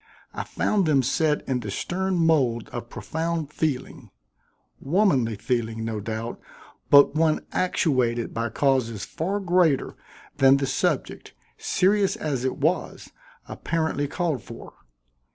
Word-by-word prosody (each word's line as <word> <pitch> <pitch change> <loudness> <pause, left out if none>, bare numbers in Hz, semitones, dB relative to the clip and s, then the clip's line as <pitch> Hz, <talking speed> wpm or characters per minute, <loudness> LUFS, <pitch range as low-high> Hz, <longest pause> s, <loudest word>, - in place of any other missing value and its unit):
I - - -4
found 200 -5 0
them 140 -4 +3
set 150 +4 0
in 130 -2 0
the 105 -4 -6
stern 190 - -2
mold 140 -9 +2
of 120 -1 -7
profound 160 -2 -3
feeling 150 -5 -3 0.7
womanly 140 - +2
feeling, 115 0 -2
no 110 -2 -3
doubt, 110 +2 -5 0.5
but 140 0 +7
one 155 0 +1
actuated 130 -10 0
by 115 0 -2
causes 115 -4 0
far 185 +5 -3
greater 175 -6 +2 0.4
than 135 0 +6
the 140 - -1
subject, - - -2 0.2
serious 195 +1 +2
as 140 -5 -3
it 130 - -1
was, 160 +6 -2 0.4
apparently 160 -3 -2
called 155 -4 -2
for. 115 0 -11
140 Hz, 125 wpm, -24 LUFS, 120-165 Hz, 0.7 s, but